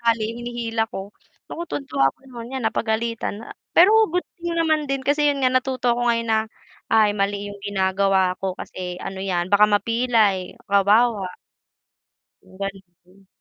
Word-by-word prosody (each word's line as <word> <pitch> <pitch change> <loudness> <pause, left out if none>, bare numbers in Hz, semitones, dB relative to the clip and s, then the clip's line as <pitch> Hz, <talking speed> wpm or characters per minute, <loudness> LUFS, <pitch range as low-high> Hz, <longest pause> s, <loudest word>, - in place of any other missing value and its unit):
tali 230 -2 +1
hinihila 235 -2 -2
ko. 195 +1 -6 0.4
Naku, 340 - -5
tuwang-tuwa 275 - 0
ako - - -42
no'n. 235 -1 -9
'Yan, 265 - -3
napagalitan 225 0 -2
a - - -11 0.2
pero 370 +5 +7 0.2
good 360 0 0
thing 345 0 -4
naman 315 -2 +2
din 275 0 -1
kasi, 290 +2 +2
'yon 280 -1 0
nga, 255 - +4
natuto 255 -2 +1
ko 245 - -1
ngayon 230 -1 0
na, 220 0 +3 0.5
"Ay, 215 -2 +5
mali 200 +1 -1
'yong 200 0 -10
ginagawa 190 -1 +1
ko. 190 -1 -1
Kasi 180 -1 -6
ano 190 0 -6
'yan, 180 -2 -1
baka 205 +1 +7
mapilay, 215 -3 +1 0.2
kawawa." 200 0 +3 1.1
'Yong 185 - -18
gano'n. 195 -1 -9
220 Hz, 155 wpm, -22 LUFS, 195-245 Hz, 1.1 s, pero